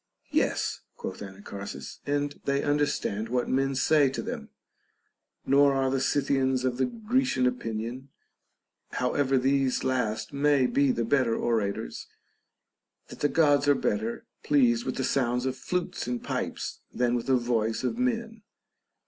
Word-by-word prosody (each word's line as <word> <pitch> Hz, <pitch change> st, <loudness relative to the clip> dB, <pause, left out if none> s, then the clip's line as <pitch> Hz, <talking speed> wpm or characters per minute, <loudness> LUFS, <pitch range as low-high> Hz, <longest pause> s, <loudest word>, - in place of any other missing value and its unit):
Yes, -, -, 0 dB
quoth 95 Hz, -, -6 dB
Ana 95 Hz, 0 st, -9 dB
charsis, 100 Hz, 0 st, -7 dB
and 145 Hz, 0 st, -1 dB
they 140 Hz, 0 st, +1 dB
understand 145 Hz, -7 st, 0 dB
what 125 Hz, 0 st, 0 dB
men 135 Hz, +1 st, +1 dB
say 145 Hz, +1 st, +4 dB
to 135 Hz, -, -4 dB
them; -, -, -5 dB, 1.0 s
nor 140 Hz, 0 st, +5 dB
are 135 Hz, -1 st, +1 dB
the 135 Hz, -1 st, 0 dB
Scythians 130 Hz, -2 st, +1 dB
of 125 Hz, -1 st, 0 dB
the 130 Hz, -1 st, +2 dB
Grecian 230 Hz, -, 0 dB
opinion 125 Hz, +1 st, -3 dB, 0.8 s
(however 135 Hz, +1 st, +1 dB
these 135 Hz, 0 st, +1 dB
last 110 Hz, -4 st, -1 dB
may 140 Hz, -1 st, +3 dB
be 140 Hz, +1 st, +3 dB
the 115 Hz, -2 st, -1 dB
better 120 Hz, -2 st, +2 dB
orators), 110 Hz, -4 st, -2 dB, 1.0 s
that -, -, -10 dB
the 145 Hz, -, +2 dB
Gods 145 Hz, -3 st, +3 dB
are 145 Hz, -, +6 dB
better 110 Hz, -1 st, -2 dB, 0.2 s
pleased 120 Hz, -5 st, +3 dB
with 130 Hz, -, -2 dB
the 130 Hz, -, -2 dB
sounds 125 Hz, -1 st, +1 dB
of 130 Hz, -1 st, -1 dB
flutes 180 Hz, +1 st, -3 dB
and 125 Hz, -1 st, -3 dB
pipes -, -, -3 dB
than 120 Hz, -1 st, +1 dB
with 120 Hz, 0 st, -1 dB
the 130 Hz, -1 st, +4 dB
voice 115 Hz, -2 st, 0 dB
of 225 Hz, -, -1 dB
men. 230 Hz, -3 st, -1 dB
130 Hz, 150 wpm, -28 LUFS, 120-145 Hz, 1.0 s, are